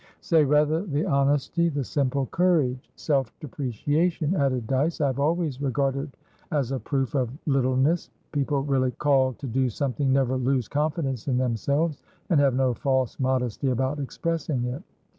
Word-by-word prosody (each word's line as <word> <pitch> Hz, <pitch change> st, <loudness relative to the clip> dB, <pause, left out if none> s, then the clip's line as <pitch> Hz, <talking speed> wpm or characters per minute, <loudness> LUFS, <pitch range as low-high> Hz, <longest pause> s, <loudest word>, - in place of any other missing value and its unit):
"Say, 160 Hz, -2 st, +3 dB
rather, 150 Hz, +3 st, +3 dB
the 155 Hz, -4 st, -1 dB
honesty, 145 Hz, +2 st, +2 dB
the 145 Hz, -3 st, -2 dB
simple 135 Hz, 0 st, 0 dB
courage. 150 Hz, -7 st, +1 dB
Self 135 Hz, -6 st, 0 dB
depreciation," 150 Hz, -, -1 dB
added 130 Hz, -7 st, 0 dB
Dyce, 135 Hz, +7 st, 0 dB
"I 150 Hz, -, +2 dB
have 135 Hz, -1 st, -1 dB
always 155 Hz, -2 st, 0 dB
regarded 135 Hz, +1 st, -1 dB, 0.3 s
as 140 Hz, -4 st, 0 dB
a 135 Hz, -, -1 dB
proof 135 Hz, -2 st, -2 dB
of 130 Hz, -4 st, +1 dB, 0.2 s
littleness. 135 Hz, +3 st, +1 dB, 0.2 s
People 140 Hz, -1 st, 0 dB
really 135 Hz, -2 st, +1 dB
called 135 Hz, -3 st, +2 dB
to 140 Hz, -, -6 dB
do 130 Hz, +2 st, +1 dB
something 135 Hz, +3 st, -1 dB
never 130 Hz, -1 st, +2 dB
lose 130 Hz, -2 st, 0 dB
confidence 145 Hz, -5 st, -2 dB
in 130 Hz, -3 st, +1 dB
themselves, 140 Hz, +6 st, 0 dB, 0.3 s
and 160 Hz, -, +5 dB
have 140 Hz, -3 st, +3 dB
no 130 Hz, -1 st, +2 dB
false 130 Hz, -1 st, -1 dB
modesty 130 Hz, 0 st, 0 dB
about 130 Hz, +3 st, -1 dB
expressing 150 Hz, -1 st, -2 dB
it." 125 Hz, +5 st, -4 dB
140 Hz, 155 wpm, -25 LUFS, 130-150 Hz, 0.3 s, and